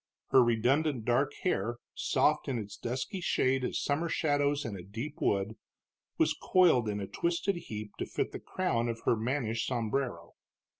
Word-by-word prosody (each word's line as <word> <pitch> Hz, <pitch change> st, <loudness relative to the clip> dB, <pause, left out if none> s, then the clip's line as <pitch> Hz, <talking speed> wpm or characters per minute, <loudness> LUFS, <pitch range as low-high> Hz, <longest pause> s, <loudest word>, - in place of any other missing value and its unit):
Her 130 Hz, -, +7 dB
redundant 125 Hz, +3 st, +2 dB
dark 135 Hz, +4 st, +2 dB
hair, 120 Hz, -, 0 dB, 0.2 s
soft -, -, +2 dB
in 130 Hz, -, -1 dB
its 105 Hz, -2 st, -6 dB
dusky 130 Hz, -, -4 dB
shade 130 Hz, -5 st, +2 dB
as -, -, -1 dB
summer 155 Hz, +4 st, 0 dB
shadows 145 Hz, -2 st, +1 dB
in 110 Hz, -, -4 dB
a 95 Hz, -, -7 dB
deep 115 Hz, +11 st, -6 dB
wood, 100 Hz, +3 st, 0 dB, 0.6 s
was -, -, +3 dB
coiled 160 Hz, -12 st, +4 dB
in 105 Hz, 0 st, -2 dB
a 100 Hz, -, -3 dB
twisted 170 Hz, -, -1 dB
heap 105 Hz, -9 st, -6 dB
to -, -, -2 dB
fit -, -, -2 dB
the -, -, -6 dB
crown 120 Hz, -11 st, -1 dB
of 115 Hz, 0 st, -4 dB
her -, -, +3 dB
mannish 115 Hz, 0 st, -1 dB
sombrero. 120 Hz, -7 st, -2 dB
125 Hz, 165 wpm, -31 LUFS, 110-145 Hz, 0.6 s, Her